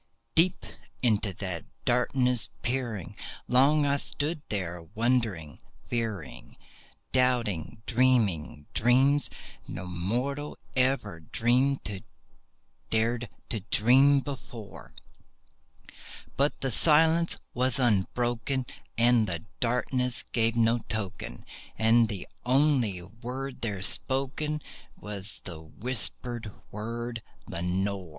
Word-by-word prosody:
Deep 175 +3 +3 0.4
into 110 -4 +2
that 90 -3 -4 0.2
darkness 125 0 +2
peering, 115 -8 -2 0.3
long 145 +4 +5
I 140 0 +2
stood 150 +3 -2
there 90 -4 -2
wondering, 110 - 0 0.3
fearing, 115 -4 -4 0.5
Doubting, 115 -6 +1
dreaming 110 - +2
dreams 135 +5 +4 0.4
no 95 - -6
mortal 120 +12 -2 0.2
ever 130 -9 +1
dared 120 - -2 0.2
to 110 - -1
dream 135 +5 +5
before; 115 - -9 1.4
But 140 +2 +1
the 135 - -1
silence 160 +5 +5 0.2
was 125 -1 +2
unbroken, 120 +2 +1 0.3
and 120 -1 +4
the 85 +1 -3
darkness 125 +1 0
gave 115 -1 +1
no 115 +1 +3
token, 100 - -4 0.3
And 115 0 +4
the 100 -4 -5 0.2
only 125 -8 +2
word 125 +7 -6
there 100 -5 -2
spoken 140 +6 -1 0.3
was 105 0 -5
the 85 -4 -8
whispered 120 +4 -4 0.2
word, 115 +2 -4 0.2
"Lenore!" 95 0 -2
120 Hz, 90 wpm, -28 LUFS, 100-130 Hz, 1.4 s, long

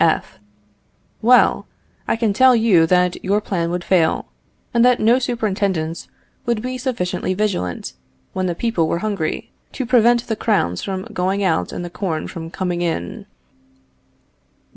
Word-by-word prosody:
F. - - 0 0.8
Well, 245 +3 +4 0.4
I - - +2
can 225 -3 0
tell 260 +3 +6
you 205 -8 +4
that 180 0 +2
your 200 +2 +2
plan 175 -5 -2
would 175 0 -3
fail, 170 -4 +2 0.5
and 235 -1 +4
that 250 0 +4
no 235 +4 +4
superintendence 195 -9 -2 0.4
would 235 -2 +1
be 255 0 -4
sufficiently 230 -7 -2
vigilant, 185 - -2 0.4
when 185 0 -1
the 175 - -2
people 200 -6 0
were 170 - 0
hungry, 195 -7 -3 0.2
to 260 - -3
prevent 240 0 +4
the 220 - -2
crowns 195 - 0
from 190 -1 -4
going 190 +3 0
out 160 - 0
and 175 - -5
the - - -6
corn 170 -5 -3
from 165 -2 -7
coming 175 0 -3
in. 90 - -3
195 Hz, 150 wpm, -20 LUFS, 175-230 Hz, 0.8 s, tell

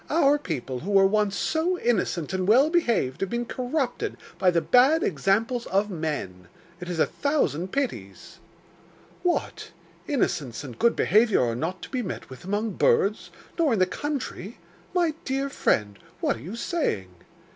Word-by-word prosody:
'Our 295 -2 +4
people, 135 - -4
who 185 - -7
were 195 -1 +5
once 205 0 +2
so 335 +3 0
innocent 190 - 0
and 185 -1 -1
well 265 +9 +5
behaved, 235 - +1
have 195 - -1
been 240 0 -2
corrupted 255 +2 -2 0.2
by 185 - +4
the 170 -1 +3
bad 265 - +4
examples 210 - 0
of 200 +2 +1
men. 145 - -4 0.3
It 180 0 -7
is 175 - -3
a - - +4
thousand 190 - -1
pities.' 275 -2 -4 0.8
'What! 355 -1 -1 0.4
innocence 145 - -1
and 130 -5 -9
good 235 0 +3
behaviour 215 - +3
are 115 -1 0
not 165 +7 -4
to - - -7
be 255 - -2
met 190 - -6
with 130 - -10
among 205 +2 -2
birds, 205 +2 +2 0.3
nor 310 -7 +3
in - - +1
the 185 - +4
country! 250 -3 -5 0.4
My 340 -3 +2
dear 270 +1 -1
friend, 105 - 0 0.2
what - - +1
are 115 - -11
you 180 - -7
saying? 235 - -2
210 Hz, 165 wpm, -25 LUFS, 170-270 Hz, 0.8 s, were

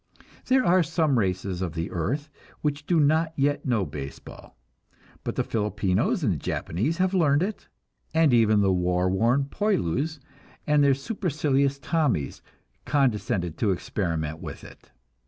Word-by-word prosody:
There 260 0 +3
are 180 +1 +5
some 160 -5 +1
races 95 -2 -2
of 85 -4 -3
the 80 0 -3
earth 120 - -2 0.4
which 145 0 -2
do 170 -2 +3
not 160 +2 +2
yet 145 +1 0
know 115 -6 +1
baseball, 70 -4 -9 0.7
but - - -3
the - - +1
Filipinos 105 -3 0
and - - +2
the - - -3
Japanese 120 - -2
have 185 0 +1
learned 155 -4 +3
it, 210 +2 -5 0.4
and 160 -4 +3
even 110 -3 +4
the 95 -1 +3
war 90 0 +1
worn 120 +8 +2
"Poilus" 155 - -1 0.5
and 150 -1 +3
the 140 -1 +4
supercilious 140 - 0
"Tommies" 140 - -1 0.4
condescended 105 - 0
to 110 - +2
experiment 80 -4 -2
with - - -8
it. - - -15
135 Hz, 145 wpm, -26 LUFS, 95-155 Hz, 0.7 s, are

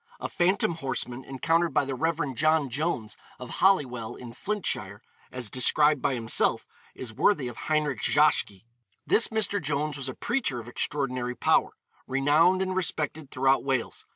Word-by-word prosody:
A - - -3
phantom 180 0 +1
horseman, 130 -3 -4
encountered 165 +4 0
by - - +3
the 135 - -3
Rev. 150 0 -1
John 155 0 +2
Jones, 125 -6 -2 0.2
of 125 -1 -9
Holywell, 125 - +2
in 120 -2 -10
Flintshire, 120 - -3 0.3
as 125 -5 -4
described 150 +2 +3
by 135 - 0
himself, 115 -2 +1 0.3
is 120 -3 -7
worthy 145 - +2
of 120 - -7
Heinrich 150 -7 0
Zschokke. 100 0 +2 0.4
This 230 - +4
Mr. 210 -2 +1
Jones 145 0 -2
was 135 -1 -4
a - - -6
preacher 235 - -1
of 115 - -10
extraordinary 125 -1 -2
power, - - +2 0.3
renowned 155 +8 +3
and 185 0 -3
respected 160 -5 -2
throughout 135 +1 +2
Wales. 130 -4 -2
140 Hz, 155 wpm, -27 LUFS, 125-165 Hz, 0.4 s, This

